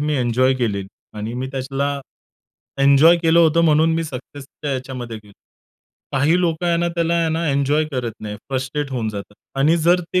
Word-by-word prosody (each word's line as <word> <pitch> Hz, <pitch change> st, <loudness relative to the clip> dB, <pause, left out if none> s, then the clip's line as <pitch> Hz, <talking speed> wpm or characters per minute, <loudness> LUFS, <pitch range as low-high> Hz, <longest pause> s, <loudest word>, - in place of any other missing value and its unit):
मी 150 Hz, 0 st, 0 dB
enjoy 130 Hz, +1 st, +2 dB
केलेली 105 Hz, -6 st, -2 dB, 0.3 s
आणि 110 Hz, +2 st, -4 dB
मी 130 Hz, +1 st, -3 dB
त्याला 140 Hz, +1 st, -2 dB, 0.8 s
एन्जॉय 140 Hz, +5 st, +6 dB
केलं 165 Hz, 0 st, +4 dB
होतं, 165 Hz, 0 st, +4 dB
म्हणून 160 Hz, 0 st, +4 dB
मी 165 Hz, 0 st, -1 dB
सक्सेसच्या 140 Hz, 0 st, -7 dB
याच्यामध्ये 125 Hz, -3 st, -5 dB
गेलो. 105 Hz, -1 st, -15 dB, 0.8 s
काही 145 Hz, +6 st, +3 dB
लोकं 170 Hz, -1 st, 0 dB
आहे 170 Hz, -1 st, +2 dB
ना 170 Hz, 0 st, 0 dB
त्याला 170 Hz, 0 st, 0 dB
आहे 165 Hz, -1 st, +1 dB
ना 165 Hz, +1 st, -1 dB
एन्जॉय 140 Hz, +2 st, +1 dB
करत 125 Hz, -4 st, -2 dB
नाहीत. 105 Hz, -1 st, -6 dB
फ्रस्ट्रेट 135 Hz, +2 st, -3 dB
होऊन 120 Hz, -4 st, -2 dB
जातात 105 Hz, -1 st, -7 dB, 0.2 s
आणि 155 Hz, +5 st, +4 dB
जर 170 Hz, +2 st, +3 dB
ते 185 Hz, -, +4 dB
140 Hz, 175 wpm, -20 LUFS, 125-165 Hz, 0.8 s, एन्जॉय